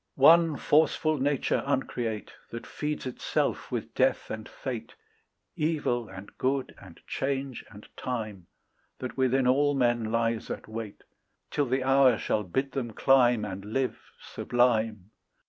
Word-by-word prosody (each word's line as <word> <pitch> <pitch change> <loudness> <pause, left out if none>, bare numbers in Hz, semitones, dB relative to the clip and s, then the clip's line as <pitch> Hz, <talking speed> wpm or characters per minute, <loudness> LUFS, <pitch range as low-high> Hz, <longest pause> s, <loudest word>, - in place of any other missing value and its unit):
One 160 +2 +6
forceful 155 0 +2
nature 140 0 +1
uncreate 120 -5 -2 0.2
That 115 - -7
feeds 150 -1 -4
itself 130 - -2
with - - -4
death - - +1
and 110 0 -6
fate, 115 -4 -6 0.6
Evil 145 - 0
and 95 +1 -11
good, 135 +1 0
and - - -14
change 135 -1 -3
and 105 -1 -13
time, 110 -8 -4 0.5
That 130 - -6
within 130 0 +2
all 145 +3 +3
men 120 -4 +1
lies 115 0 0
at - - -5
wait 110 -2 -7 0.5
Till 145 -2 +1
the 130 +1 0
hour 135 -3 +5
shall 105 - 0
bid 135 +9 -2
them 125 -4 -3
climb 125 -4 +4
And 95 -1 -6
live 125 +5 -2 0.2
sublime. 110 -5 0
125 Hz, 135 wpm, -28 LUFS, 110-135 Hz, 0.6 s, One